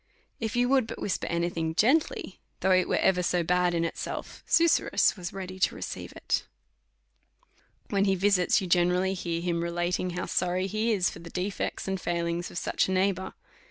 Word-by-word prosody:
If 225 -1 -3
you 245 0 +3
would 260 -3 +3
but - - -7
whisper 200 - -2
any 170 0 0
thing 160 -1 -2
gently, 250 - +1 0.2
though 190 - +2
it 185 -1 +3
was - - +2
ever 180 -1 +3
so 175 0 +1
bad 180 +1 +2
in 170 0 +1
itself, 165 - -5
Su 335 - +5
surrus - - +3
was 175 -3 -6
ready 190 -1 -7
to - - +2
receive - - -6
it. - - -2 1.4
When 200 0 +2
he 195 -1 +3
visits, 190 0 +3
you - - -3
generally 180 +1 +2
hear 170 -3 -3
him 170 -1 -1
relating 175 +2 -1
how 180 - -2
sorry 180 +1 0
he 215 +4 0
is 190 -4 +2
for - - -10
the 170 0 -10
defects 185 +3 -3
and 190 -1 -2
failings 170 0 -2
of - - -8
such - - 0
a - - -2
neighbour. 190 0 0
185 Hz, 195 wpm, -28 LUFS, 175-195 Hz, 1.4 s, Su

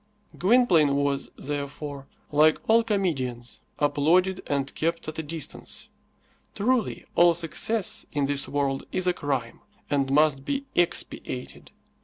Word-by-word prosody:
Gwynplaine 180 - +4
was, 140 -1 0
therefore, 140 -1 -5 0.2
like 155 +1 +5
all 230 +1 +5
comedians, 135 - -2 0.2
applauded 175 +6 +2
and 140 -1 -1
kept 165 +1 -2
at 155 +1 -5
a - - 0
distance. 155 -1 -4 0.7
Truly, 240 +1 0
all 175 -1 +5
success 180 +5 0
in 145 -2 0
this 140 0 +1
world 140 -1 -1
is 185 - 0
a 180 - +3
crime, 135 -8 -3 0.3
and 140 -2 +1
must 145 -1 +3
be 280 - -2
expiated. 145 -6 -1
150 Hz, 125 wpm, -26 LUFS, 140-180 Hz, 0.7 s, like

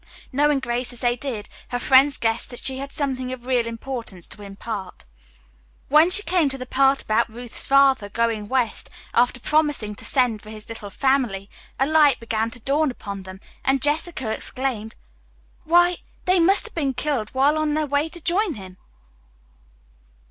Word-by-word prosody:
Knowing 290 +1 +3
Grace 245 -1 -1
as 245 - -8
they 240 -1 +2
did, 245 -5 -5 0.2
her 245 - -2
friends 270 +3 +5
guessed 225 0 0
that 245 - -8
she 265 -1 0
had 275 +1 -6
something 260 -3 -2
of 250 -2 -7
real 250 -2 +1
importance 230 -6 -6
to 210 - -7
impart. 195 - -7 0.9
When 305 +4 +6
she 415 +3 +3
came 350 -7 +2
to 270 - -4
the 255 - -6
part 270 +1 +2
about 215 +2 +1
Ruth's 240 +1 -4
father 270 -6 +4
going 225 -1 -1
west 250 -2 -1 0.2
after 245 +1 +2
promising 295 -7 +1
to - - -11
send 245 -5 +1
for 215 - -13
his 215 -1 -7
little 225 -3 -8
family, 235 -5 0 0.3
a 270 - +4
light 300 -2 +4
began 225 -1 -1
to 235 - -11
dawn 285 +5 +1
upon 200 -5 -6
them, 190 +1 -11 0.2
and 270 0 +2
Jessica 295 -4 0
exclaimed: 235 -2 -2 0.7
"Why, 350 +2 +4 0.3
they 365 0 +3
must 385 +6 +3
have 455 - -10
been 275 -5 -1
killed 250 -5 -1
while 280 +3 +4
on 310 -1 0
their 310 0 +1
way 285 +2 0
to 345 - -11
join 355 +2 0
him!" 190 -3 -11
260 Hz, 175 wpm, -23 LUFS, 225-290 Hz, 0.9 s, When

